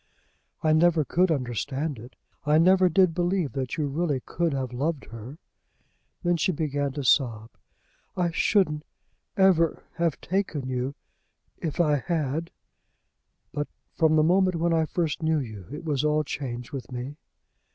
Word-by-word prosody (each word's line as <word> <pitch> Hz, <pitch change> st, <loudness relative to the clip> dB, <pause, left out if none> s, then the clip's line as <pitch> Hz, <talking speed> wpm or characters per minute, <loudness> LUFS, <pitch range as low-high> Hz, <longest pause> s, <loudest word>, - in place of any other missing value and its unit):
"I 155 Hz, -1 st, +4 dB
never 160 Hz, -1 st, +4 dB
could 180 Hz, +5 st, +2 dB
understand 135 Hz, 0 st, -2 dB
it. 120 Hz, +4 st, -12 dB, 0.3 s
I 150 Hz, +1 st, +4 dB
never 185 Hz, +2 st, +5 dB
did 180 Hz, 0 st, +4 dB
believe 175 Hz, -2 st, 0 dB
that 130 Hz, 0 st, -3 dB
you 155 Hz, -, 0 dB
really 145 Hz, 0 st, 0 dB
could 170 Hz, +5 st, -1 dB
have 130 Hz, -3 st, -3 dB
loved 145 Hz, +3 st, -2 dB
her." 115 Hz, +6 st, -9 dB, 0.9 s
Then 175 Hz, -1 st, +2 dB
she 175 Hz, -, +1 dB
began 145 Hz, -3 st, -1 dB
to 145 Hz, 0 st, -4 dB
sob. 115 Hz, -4 st, +2 dB, 0.7 s
"I 175 Hz, -2 st, +1 dB
shouldn't 165 Hz, -4 st, +2 dB, 0.5 s
ever 180 Hz, -4 st, +4 dB
have 170 Hz, -3 st, 0 dB
taken 165 Hz, -7 st, -2 dB
you 130 Hz, +2 st, -2 dB, 0.6 s
if 160 Hz, -2 st, -4 dB
I 150 Hz, -4 st, +4 dB
had." 160 Hz, +1 st, -2 dB, 1.0 s
"But 145 Hz, 0 st, -2 dB, 0.3 s
from 160 Hz, -2 st, +3 dB
the 155 Hz, -, +5 dB
moment 185 Hz, +2 st, +3 dB
when 170 Hz, +1 st, +1 dB
I 160 Hz, -1 st, +3 dB
first 165 Hz, -1 st, -2 dB
knew 160 Hz, 0 st, +2 dB
you 110 Hz, -, -6 dB
it 150 Hz, +4 st, -7 dB
was 145 Hz, -3 st, 0 dB
all 150 Hz, 0 st, +2 dB
changed 125 Hz, -4 st, -5 dB
with 135 Hz, -2 st, -6 dB
me." 125 Hz, +4 st, -5 dB
155 Hz, 150 wpm, -26 LUFS, 135-170 Hz, 1.0 s, never